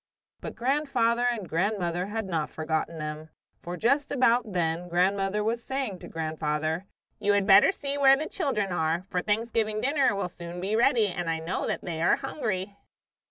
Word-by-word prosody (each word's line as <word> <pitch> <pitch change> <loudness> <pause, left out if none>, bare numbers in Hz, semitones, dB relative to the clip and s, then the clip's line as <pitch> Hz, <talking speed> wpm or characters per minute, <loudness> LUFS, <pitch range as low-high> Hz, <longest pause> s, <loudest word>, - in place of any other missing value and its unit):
But - - -7
grandfather 245 -3 +1
and 220 -6 -3
grandmother 180 0 -1
had 220 +1 -3
not 165 -5 -2
forgotten 160 +1 -2
them, 155 0 -6 0.3
for 175 +1 -6
just 275 +7 +2
about 245 -4 +2
then 170 0 -1
grandmother 195 +3 +1
was 230 +2 -1
saying 265 -9 -3
to - - -10
grandfather: 155 +2 -2 0.3
"You 205 - +2
had 200 -1 +2
better 195 - +7
see 285 -5 -4
where 270 -1 +7
the 310 - -3
children 210 -9 -1
are, 165 0 0
for 180 - 0
Thanksgiving 215 +1 0
dinner 275 -3 +2
will 200 -2 -1
soon 175 0 -8
be 195 +4 -1
ready 235 -1 +4
and 175 -3 -3
I 165 - 0
know 165 +3 -3
that - - -2
they 165 -3 -4
are - - +4
hungry." 205 -8 -4
195 Hz, 175 wpm, -27 LUFS, 170-235 Hz, 0.3 s, better